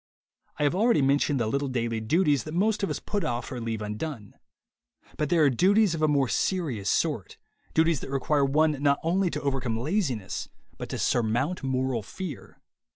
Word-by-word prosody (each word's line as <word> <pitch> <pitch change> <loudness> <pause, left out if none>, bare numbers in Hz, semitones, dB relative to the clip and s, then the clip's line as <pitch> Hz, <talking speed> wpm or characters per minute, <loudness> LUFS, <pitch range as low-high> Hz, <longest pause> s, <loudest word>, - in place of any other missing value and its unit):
I - - -1
have 145 - +2
already 205 - +3
mentioned 140 0 +2
the 115 - +1
little 140 +6 -1
daily 120 -3 -1
duties 145 +4 +2
that 155 +1 -6
most 210 +4 +1
of 195 - 0
us - - -2
put 205 -1 -3
off 120 0 -3
or 125 -2 -5
leave 115 -1 -3
undone. 105 +1 -5 0.8
But 150 -2 -1
there 165 -3 +4
are 145 - +6
duties 195 - +3
of 160 - -3
a 155 - +4
more 140 -3 +2
serious 130 - -1
sort, - - -1 0.4
duties 160 -2 +3
that - - -8
require 140 +2 +1
one 155 +3 +3
not 140 -1 +3
only 180 +3 +1
to 150 - -4
overcome 130 -5 -1
laziness 130 - -2 0.3
but - - -6
to - - -3
surmount 120 +9 0
moral 130 -3 -1
fear. 155 - -8
140 Hz, 185 wpm, -27 LUFS, 120-165 Hz, 0.8 s, are